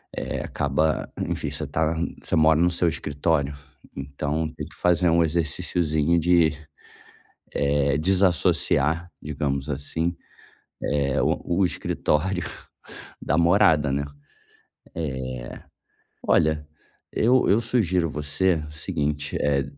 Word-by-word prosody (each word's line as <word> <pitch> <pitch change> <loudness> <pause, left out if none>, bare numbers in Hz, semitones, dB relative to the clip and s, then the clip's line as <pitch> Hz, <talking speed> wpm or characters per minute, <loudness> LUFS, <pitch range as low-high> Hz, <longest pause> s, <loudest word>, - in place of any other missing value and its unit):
eh, - - -3
acaba 70 +2 -1 0.2
enfim, - - -3
você - - -5
tá 80 +1 0 0.3
você - - -1
mora 80 0 +5
no 90 +1 +3
seu 85 0 +1
escritório, 75 -1 0 0.4
então, 70 +3 -2
tem 75 - -5
que - - -16
fazer 90 0 +2
um 85 +1 +4
exerciciozinho 80 0 0
de, 85 -1 +4 1.0
eh, 70 0 +1
desassociar, 85 -2 +2
digamos 70 -1 -3
assim, 80 +5 -2 0.7
eh, 70 -2 0
o 85 - 0
o 95 - +5
escritório 90 +1 -1 0.8
da 75 - 0
morada, 80 -4 +4
né. 70 +1 0
Eh, 70 0 -11 2.1
olha, 75 -2 +2 0.4
eu 125 +3 +3
eu 105 +4 +4
sugiro 95 -9 +1
você 80 +5 0
o - - -12
seguinte: 75 -1 -2
eh, 70 -1 +1
80 Hz, 110 wpm, -24 LUFS, 75-85 Hz, 2.1 s, mora